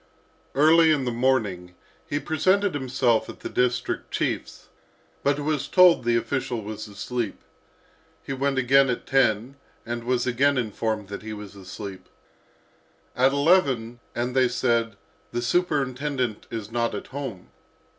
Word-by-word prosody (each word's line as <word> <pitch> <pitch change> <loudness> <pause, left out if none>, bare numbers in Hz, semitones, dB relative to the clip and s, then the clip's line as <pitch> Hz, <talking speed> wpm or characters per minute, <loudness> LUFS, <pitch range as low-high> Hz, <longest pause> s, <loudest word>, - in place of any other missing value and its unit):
Early 160 +3 +6
in 140 -4 +1
the 125 - 0
morning, 110 -8 0 0.3
he 145 - -1
presented 185 +6 +1
himself 130 -4 +1
at - - -10
the - - -5
district 125 0 -1
chief's, - - -3 0.5
but 140 +1 +1
was 145 -1 -1
told 180 -7 +6
the 120 0 +3
official 115 -1 -2
was 110 +1 -6
asleep. 105 +2 -4 0.8
He 135 - -4
went 135 0 -1
again 135 +1 +4
at 125 - -2
ten 130 0 +1 0.3
and 120 0 -4
was 125 0 0
again 135 +3 +2
informed 110 -2 -2
that 100 - -6
he 110 +1 -6
was 105 -1 -9
asleep. 95 0 -9 1.1
At 130 +2 +4
eleven, 140 -6 +2 0.2
and 125 +2 -2
they 130 -1 +5
said, 115 -3 0 0.4
"The 120 - -1
superintendent 135 - -1
is 110 -2 -6
not 115 -1 0
at 100 - -5
home." 130 -10 -6
125 Hz, 140 wpm, -25 LUFS, 115-140 Hz, 1.1 s, Early